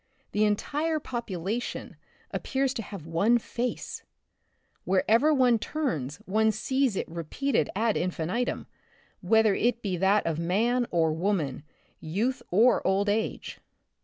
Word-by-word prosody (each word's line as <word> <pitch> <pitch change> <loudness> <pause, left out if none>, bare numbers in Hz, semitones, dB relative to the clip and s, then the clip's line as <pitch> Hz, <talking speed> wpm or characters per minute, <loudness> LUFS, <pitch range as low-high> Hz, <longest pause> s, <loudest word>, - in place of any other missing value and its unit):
The 210 +1 +2
entire 300 +10 0
population 230 - -4 0.4
appears 270 -1 -1
to 235 - -3
have 200 -6 -9
one 195 +9 +3
face; 240 +1 -4 0.8
wherever 225 +10 +3
one 250 -5 +4
turns 160 - -2
one 220 +3 +2
sees 260 +1 0
it - - -2
repeat 170 - -3
ed - - +2
ad 220 +1 +1
infinitum^ 180 +7 -2 0.6
whether 220 +2 +4
it 235 +3 0
be 190 -3 -1
that 195 +4 +3
of 165 -1 -1
man 230 +8 +1
or 160 -2 +2
woman, 160 -6 -1 0.4
youth 220 +11 -1
or 230 +7 +4
old 200 +2 +1
age. 220 +2 -2
215 Hz, 130 wpm, -27 LUFS, 180-245 Hz, 0.8 s, one